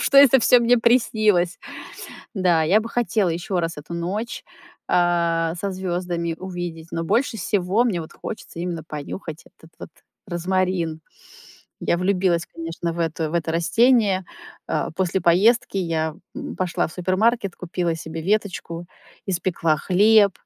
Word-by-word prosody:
что 275 Hz, -, +5 dB
это 275 Hz, -2 st, +8 dB
всё 245 Hz, 0 st, +6 dB
мне 240 Hz, +1 st, +4 dB
приснилось. 215 Hz, -6 st, +2 dB, 0.8 s
Да, 175 Hz, -4 st, +3 dB
я 190 Hz, +7 st, +4 dB
бы 225 Hz, +1 st, -6 dB
хотела 220 Hz, -5 st, +1 dB
ещё 175 Hz, +2 st, -2 dB
раз 165 Hz, -1 st, -3 dB
эту 150 Hz, +3 st, -8 dB
ночь, 195 Hz, +7 st, -4 dB, 0.4 s
а, 170 Hz, -2 st, +2 dB
со 200 Hz, -, -3 dB
звёздами 175 Hz, -2 st, -3 dB
увидеть, 175 Hz, -3 st, -6 dB
но 165 Hz, -, -2 dB
больше 225 Hz, +6 st, 0 dB
всего 195 Hz, +3 st, +1 dB
мне 190 Hz, -8 st, 0 dB
вот 160 Hz, -, -10 dB
хочется 215 Hz, -6 st, -8 dB
именно 170 Hz, -2 st, -3 dB
понюхать 155 Hz, +2 st, -7 dB, 0.2 s
этот 160 Hz, -, -17 dB
вот -, -, -8 dB, 0.4 s
розмарин. 180 Hz, -2 st, -1 dB, 0.8 s
Я 170 Hz, -, +1 dB
влюбилась, 180 Hz, -2 st, +1 dB
конечно, 165 Hz, +1 st, -5 dB
в 170 Hz, -, -7 dB
эту, 160 Hz, 0 st, -3 dB
в -, -, -8 dB
это 165 Hz, -1 st, 0 dB
растение. 200 Hz, +3 st, +3 dB, 0.4 s
А, -, -, -1 dB
после 185 Hz, +2 st, -1 dB
поездки 200 Hz, +5 st, +3 dB
я, 160 Hz, -3 st, -1 dB, 0.2 s
м, -, -, -6 dB
пошла 185 Hz, -2 st, 0 dB
в -, -, -12 dB
супермаркет, 190 Hz, +4 st, +1 dB
купила 175 Hz, -1 st, -2 dB
себе 160 Hz, 0 st, -6 dB
веточку, 180 Hz, -3 st, -2 dB, 0.4 s
испекла 170 Hz, -3 st, 0 dB
хлеб, 205 Hz, +4 st, +5 dB
180 Hz, 145 wpm, -22 LUFS, 165-200 Hz, 0.8 s, это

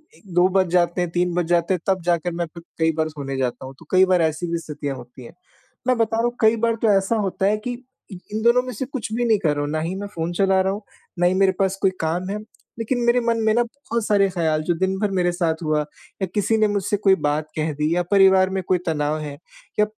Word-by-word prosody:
ए -, -, -21 dB
2 175 Hz, +1 st, +5 dB
बज 190 Hz, 0 st, +2 dB
जाते 175 Hz, 0 st, +2 dB
हैं, 175 Hz, -, -1 dB
3 175 Hz, 0 st, 0 dB
बज 175 Hz, -1 st, +1 dB
जाते 170 Hz, +1 st, +2 dB
हैं 180 Hz, -, -1 dB
तब 190 Hz, -1 st, +1 dB
जाकर 175 Hz, 0 st, +1 dB
मैं 170 Hz, +1 st, -2 dB
फिर 170 Hz, -, -11 dB, 0.2 s
कई 160 Hz, 0 st, +3 dB
बार 155 Hz, 0 st, 0 dB
सोने 140 Hz, -3 st, -6 dB
जाता 130 Hz, 0 st, -2 dB
हूँ, 135 Hz, -, -9 dB
तो 165 Hz, -, -15 dB
कई 185 Hz, 0 st, +6 dB
बार 185 Hz, -2 st, +3 dB
ऐसी 160 Hz, +2 st, 0 dB
भी 170 Hz, -, 0 dB
स्थितियाँ 145 Hz, -3 st, -5 dB
होती 125 Hz, 0 st, -12 dB
हैं। -, -, -12 dB, 0.5 s
मैं 255 Hz, -, +3 dB
बता 225 Hz, 0 st, +1 dB
रहा 230 Hz, -, +1 dB
हूँ 240 Hz, 0 st, -1 dB
कई 220 Hz, 0 st, +5 dB
बार 230 Hz, -, +1 dB
तो 225 Hz, -, +3 dB
ऐसा 195 Hz, +4 st, 0 dB
होता 190 Hz, 0 st, -1 dB
है 210 Hz, +2 st, +3 dB
कि, 245 Hz, +4 st, -4 dB, 0.4 s
इ 190 Hz, -, -7 dB, 0.2 s
इन 215 Hz, -, -1 dB
दोनों 235 Hz, +1 st, +5 dB
में 255 Hz, -, -6 dB
से 250 Hz, +5 st, -4 dB
कुछ 255 Hz, -4 st, -5 dB
भी 240 Hz, +2 st, 0 dB
नहीं 220 Hz, -3 st, +4 dB
कर 160 Hz, -, +1 dB
रहा 145 Hz, -, -2 dB
हूँ, 145 Hz, -, -2 dB
ना 155 Hz, -, -1 dB
ही 170 Hz, +4 st, -3 dB
मैं 205 Hz, +1 st, -5 dB
फ़ोन 170 Hz, -4 st, -4 dB
चला 190 Hz, +1 st, +2 dB
रहा 190 Hz, +1 st, 0 dB
हूँ, 205 Hz, -, -6 dB, 0.4 s
ना 175 Hz, -, +3 dB
ही 180 Hz, -, +4 dB
मेरे 195 Hz, 0 st, +4 dB
पास 195 Hz, 0 st, +1 dB
कोई 190 Hz, -, +3 dB
काम 170 Hz, +4 st, -1 dB
है 205 Hz, -, -2 dB, 0.4 s
लेकिन 245 Hz, +2 st, -1 dB
मेरे 240 Hz, +1 st, +4 dB
मन 230 Hz, 0 st, +1 dB
में 220 Hz, -, +4 dB
ना 240 Hz, +2 st, +3 dB
बहुत 235 Hz, -2 st, -4 dB
सारे 200 Hz, -2 st, +3 dB
ख़्याल 160 Hz, -4 st, 0 dB
जो 175 Hz, -, +3 dB
दिन 190 Hz, 0 st, 0 dB
भर 210 Hz, -2 st, 0 dB
मेरे 175 Hz, -1 st, +2 dB
साथ 170 Hz, -2 st, 0 dB
हुआ 155 Hz, -1 st, +1 dB, 0.4 s
या -, -, +3 dB
किसी 215 Hz, +2 st, +2 dB
ने 215 Hz, -1 st, +3 dB
मुझसे 205 Hz, 0 st, -1 dB
कोई 195 Hz, -1 st, +4 dB
बात 150 Hz, +1 st, -1 dB
कह 155 Hz, 0 st, -1 dB
दी 150 Hz, +3 st, 0 dB
या 180 Hz, -, +1 dB
परिवार 190 Hz, -1 st, +5 dB
में 190 Hz, 0 st, -2 dB
कोई 185 Hz, -, +3 dB
तनाव 150 Hz, -1 st, 0 dB
है 145 Hz, -2 st, -6 dB, 0.4 s
या 210 Hz, -, +6 dB
185 Hz, 275 wpm, -22 LUFS, 165-210 Hz, 0.5 s, कई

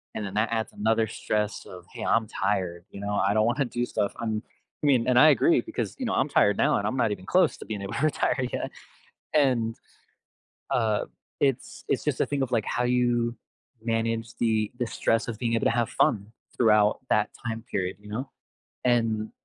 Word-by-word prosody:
And 110 Hz, -, -3 dB
then, 95 Hz, -, -6 dB
that 110 Hz, +1 st, +2 dB
adds 110 Hz, -1 st, -2 dB
another 110 Hz, +1 st, +1 dB
stress 105 Hz, -1 st, -2 dB
of, 90 Hz, -1 st, -11 dB
"Hey, -, -, -6 dB
I'm 115 Hz, -1 st, +2 dB
tired," 95 Hz, -4 st, -2 dB
you 100 Hz, -, -9 dB
know? 100 Hz, 0 st, -3 dB
"I 100 Hz, 0 st, +2 dB
don't 110 Hz, 0 st, +4 dB
wanna 120 Hz, +4 st, +1 dB
do 120 Hz, 0 st, -2 dB
stuff, 100 Hz, -4 st, -1 dB
I'm" 110 Hz, -2 st, -2 dB, 0.4 s
I 150 Hz, -, +2 dB
mean, 125 Hz, -4 st, +3 dB
and 125 Hz, -1 st, +3 dB
I 155 Hz, -, +8 dB
agree 335 Hz, -, +4 dB
because, 330 Hz, -, -4 dB
you 255 Hz, -, -2 dB
know, 225 Hz, -, -1 dB
I'm 135 Hz, -, +2 dB
tired 105 Hz, -7 st, +3 dB
now, -, -, +3 dB
and 100 Hz, -, -1 dB
I'm 130 Hz, -, -2 dB
not 115 Hz, -4 st, +2 dB
even 95 Hz, -2 st, -5 dB
close 185 Hz, -, +3 dB
to -, -, -10 dB
being 105 Hz, -2 st, -5 dB
able 100 Hz, -, -5 dB
to 140 Hz, -, -2 dB
retire 130 Hz, -3 st, +1 dB
yet. -, -, -3 dB, 0.6 s
And, 125 Hz, -6 st, +2 dB, 0.9 s
uh, 110 Hz, -3 st, +1 dB, 0.3 s
it's 135 Hz, -3 st, -1 dB
it's -, -, 0 dB
just -, -, -1 dB
a -, -, +3 dB
thing 140 Hz, -2 st, -1 dB
of, 130 Hz, -, -3 dB
like, 115 Hz, -3 st, +2 dB
how 125 Hz, -, 0 dB
you 120 Hz, -1 st, +1 dB, 0.5 s
manage 115 Hz, 0 st, -1 dB
the 110 Hz, -2 st, +1 dB
the 120 Hz, -, 0 dB
stress 115 Hz, 0 st, 0 dB
of 115 Hz, -2 st, -4 dB
being 115 Hz, -1 st, 0 dB
able 115 Hz, -, +1 dB
to -, -, +5 dB
have 115 Hz, 0 st, +1 dB
fun 105 Hz, 0 st, +1 dB, 0.2 s
throughout 105 Hz, -3 st, +4 dB
that -, -, +2 dB, 0.2 s
time 115 Hz, -1 st, -3 dB
period, 95 Hz, -1 st, -2 dB
you 105 Hz, -, -14 dB
know? 130 Hz, +6 st, -4 dB, 0.6 s
And 115 Hz, -3 st, +1 dB
115 Hz, 210 wpm, -26 LUFS, 105-125 Hz, 0.9 s, I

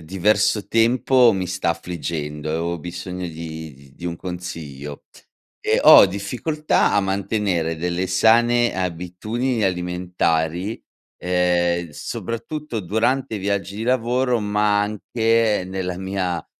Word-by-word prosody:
diverso 100 Hz, +4 st, +1 dB
tempo 120 Hz, +2 st, +4 dB
mi 95 Hz, -1 st, -2 dB
sta 90 Hz, -2 st, 0 dB
affliggendo 75 Hz, -4 st, -4 dB
e 80 Hz, -, -1 dB
ho 85 Hz, +1 st, -2 dB
bisogno 90 Hz, +2 st, -6 dB
di 80 Hz, -2 st, -7 dB
di 70 Hz, 0 st, -19 dB
di 85 Hz, -, -12 dB
un 85 Hz, -, -2 dB
consiglio. 80 Hz, -6 st, -7 dB, 0.6 s
Ehm, -, -, +1 dB
ho -, -, +9 dB
difficoltà 125 Hz, -, 0 dB
a 100 Hz, -, +4 dB
mantenere 95 Hz, -4 st, -1 dB
delle 90 Hz, +2 st, -2 dB
sane 120 Hz, +5 st, +4 dB
abitudini 95 Hz, +7 st, -2 dB
alimentari, 90 Hz, +1 st, -1 dB, 0.4 s
ehm, 85 Hz, -1 st, +1 dB
soprattutto 115 Hz, -, -5 dB
durante 110 Hz, +7 st, 0 dB
i -, -, -4 dB
viaggi 100 Hz, 0 st, -2 dB
di 110 Hz, -, -4 dB
lavoro, 125 Hz, 0 st, +1 dB
ma 105 Hz, -1 st, +1 dB
anche 110 Hz, 0 st, +1 dB
nella 95 Hz, -1 st, -4 dB
mia 95 Hz, -3 st, -2 dB
95 Hz, 120 wpm, -22 LUFS, 85-110 Hz, 0.6 s, ho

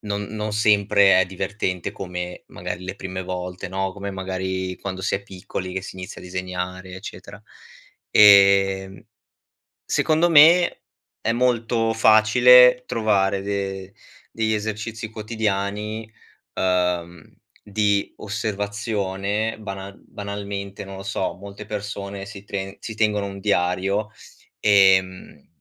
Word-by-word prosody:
non 105 Hz, -1 st, -3 dB
non 105 Hz, 0 st, -5 dB
sempre 100 Hz, -2 st, +4 dB
è -, -, +3 dB
divertente 95 Hz, -1 st, -3 dB
come 90 Hz, -1 st, -6 dB
magari 90 Hz, -, -6 dB
le 95 Hz, +2 st, -6 dB
prime 95 Hz, -1 st, -5 dB
volte, 90 Hz, 0 st, -5 dB
no, 95 Hz, 0 st, -2 dB
come 100 Hz, 0 st, -6 dB
magari 95 Hz, -1 st, -4 dB
quando 95 Hz, -1 st, -6 dB
si -, -, 0 dB
è 100 Hz, -, -3 dB
piccoli 95 Hz, -1 st, -7 dB
che 95 Hz, -, -2 dB
si 95 Hz, -, -9 dB
inizia 90 Hz, -1 st, -8 dB
a -, -, -12 dB
disegnare, 90 Hz, 0 st, -5 dB
eccetera. 95 Hz, -, -10 dB, 0.7 s
Ehm, 100 Hz, -1 st, +5 dB, 0.8 s
secondo 160 Hz, +2 st, +2 dB
me 165 Hz, +3 st, +6 dB, 0.4 s
è 115 Hz, -, 0 dB
molto 115 Hz, -2 st, +1 dB
facile 125 Hz, +3 st, +6 dB
trovare 100 Hz, -3 st, +1 dB
de 100 Hz, -1 st, -4 dB, 0.4 s
degli 110 Hz, -1 st, 0 dB
esercizi 110 Hz, +1 st, -4 dB
quotidiani, 105 Hz, 0 st, -3 dB, 0.4 s
ehm, 90 Hz, -2 st, -1 dB, 0.3 s
di 100 Hz, -1 st, 0 dB
osservazione, 105 Hz, 0 st, -3 dB
banal 95 Hz, -1 st, -8 dB
banalmente, 100 Hz, 0 st, -6 dB
non 95 Hz, 0 st, -9 dB
lo 95 Hz, -, -8 dB
so, 95 Hz, -1 st, -2 dB
molte 100 Hz, +2 st, -10 dB
persone 100 Hz, -1 st, -5 dB
si 100 Hz, -1 st, -10 dB
tren 95 Hz, -1 st, -5 dB
si 110 Hz, -, -7 dB
tengono 105 Hz, -2 st, +1 dB
un 100 Hz, 0 st, -8 dB
diario, 100 Hz, +2 st, 0 dB, 0.5 s
ehm, 95 Hz, -2 st, +3 dB
100 Hz, 120 wpm, -22 LUFS, 95-105 Hz, 0.8 s, me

